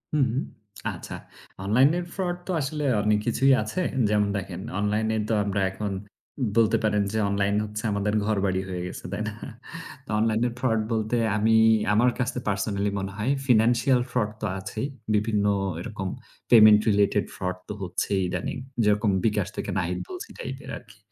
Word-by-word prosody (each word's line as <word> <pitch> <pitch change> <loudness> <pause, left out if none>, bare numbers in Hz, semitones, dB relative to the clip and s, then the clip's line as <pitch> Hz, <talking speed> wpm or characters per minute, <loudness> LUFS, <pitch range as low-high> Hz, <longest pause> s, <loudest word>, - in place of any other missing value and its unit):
হুম। 135 -4 +3 0.7
আচ্ছা, - - -8 0.5
অনলাইনের 135 - +3
fraud 175 -2 -2
তো - - -1
আসলে 150 +2 -3 0.2
অনেক 105 0 +2
কিছুই 135 +3 +4
আছে। 110 +12 -3 0.3
যেমন 105 -1 +2
দেখেন 95 -1 -5 0.2
অনলাইনে 110 +2 0
তো - - +2
আমরা 100 -1 -1
এখন 100 +1 -4 0.7
বলতে 115 -1 +4
পারেন 105 -1 +2
যে - - 0
অনলাইন 100 0 +1
হচ্ছে 105 0 -5
আমাদের 100 +1 0
ঘরবাড়ি 100 -3 +1
হয়ে 90 -1 -3
গেছে, - - -8
তাই 100 - -3
না? 110 - -4 0.7
তো - - -23
অনলাইনের 115 +2 +1
fraud 115 -4 +1
বলতে 110 +2 0 0.2
আমি 110 +1 +3 0.4
আমার 120 +4 +4
কাছে 125 0 -1
personally 100 0 -1
মনে 95 0 -4
হয় 115 +6 0 0.2
financial 120 +2 +4
fraud 105 -4 0
তো - - -1
আছেই, 100 +7 -4 0.3
বিভিন্ন 105 -1 +1 0.3
এরকম 105 -1 -5 0.4
payment 110 -3 +9
related 100 -1 +2
fraud 90 0 -3
তো - - -4
হচ্ছেই 95 +2 -1
ইদানিং। - - -3 0.3
যেরকম 105 0 +3
বিকাশ 105 -3 +1
থেকে - - -3
নাহিদ 90 -1 -1
বলছি - - -7
টাইপের 130 +1 -7
আরকি। 105 -4 -16
105 Hz, 155 wpm, -26 LUFS, 100-120 Hz, 0.7 s, payment